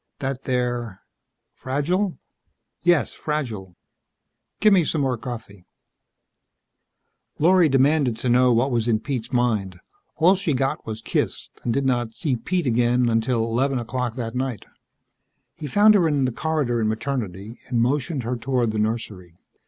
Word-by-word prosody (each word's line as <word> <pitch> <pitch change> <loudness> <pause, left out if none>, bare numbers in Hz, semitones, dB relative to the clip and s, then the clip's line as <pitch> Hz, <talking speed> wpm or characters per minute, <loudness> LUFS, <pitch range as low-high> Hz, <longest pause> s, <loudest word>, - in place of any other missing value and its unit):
"That 135 -2 -4
they're 120 -5 -2 0.3
..." - - -56
"Fragile?" 170 +7 -1 0.6
"Yes 175 -5 +2
fragile." 115 - -4 0.8
"Give 215 -1 +5
me 185 -3 +5
some 155 -1 0
more 130 -2 +1
coffee." 110 -6 -8 1.7
Lorry 175 0 +4
demanded 135 -2 +2
to 125 - -3
know 125 +1 +4
what 120 +4 +2
was 120 -1 0
in 110 -2 +2
Pete's 125 -3 -4
mind. 110 -7 0 0.4
All 170 +4 +5
she 190 -5 -1
got 135 -1 -2
was 110 0 -6
kissed, - - -2
and - - -3
she - - +2
did 140 +3 0
not 120 -3 0
see 145 -7 -1
Pete 175 +7 -2
again 120 0 +2
until 115 +1 +1
eleven 130 +4 0
o'clock 120 0 -3
that 115 -3 -4
night. 125 -4 -3 0.9
He 150 - -7
found 205 +8 +5
her 185 -5 +4
in 145 -4 +1
the 130 - 0
corridor 140 -4 -1
in 110 - +1
Maternity 110 -3 -4
and 120 - 0
motioned 135 +3 0
her 120 +2 -2
toward 120 -1 0
the 110 - -2
nursery. 105 -6 -3
125 Hz, 155 wpm, -23 LUFS, 115-140 Hz, 1.7 s, Give